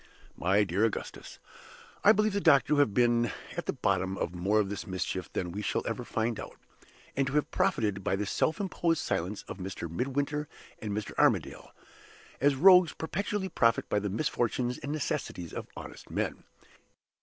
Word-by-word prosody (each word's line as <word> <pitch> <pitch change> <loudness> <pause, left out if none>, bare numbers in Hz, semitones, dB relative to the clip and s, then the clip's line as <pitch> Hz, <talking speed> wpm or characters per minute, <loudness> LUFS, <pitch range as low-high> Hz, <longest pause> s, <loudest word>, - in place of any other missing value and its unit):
My 95 +4 +3
dear 95 +2 0
Augustus, 115 -2 -3 0.7
I 205 - +8
believe 215 -1 +2
the 200 - 0
doctor 145 -6 +5
to 150 - +3
have 145 -7 +4
been 120 +1 +3 0.2
at - - -4
the - - 0
bottom 95 0 0
of 85 - -2
more 95 +5 +1
of 105 - +1
this 100 0 -5
mischief 95 -1 -3
than 90 -1 -2
we 100 +4 -4
shall - - -1
ever - - -3
find 115 0 -1
out; - - -8 0.6
and 135 0 +1
to 135 - -3
have 150 0 +1
profited 105 -4 0
by 95 - +1
the 105 +1 -2
self 155 +9 0
imposed 175 -4 0
silence 95 +5 -2
of 95 - -9
Mr. 95 -2 -5
Midwinter 140 - -2 0.3
and 105 - -4
Mr. 105 0 -3
Armadale, - - +2 0.7
as 140 +1 +3
rogues 180 +3 +7
perpetually 195 +4 -2
profit 115 -8 +2
by 105 - +2
the 105 0 -2
misfortunes 120 +1 -1
and 145 - -5
necessities 145 - -3
of - - -5
honest - - -10
men. - - -3
115 Hz, 180 wpm, -30 LUFS, 100-150 Hz, 0.7 s, I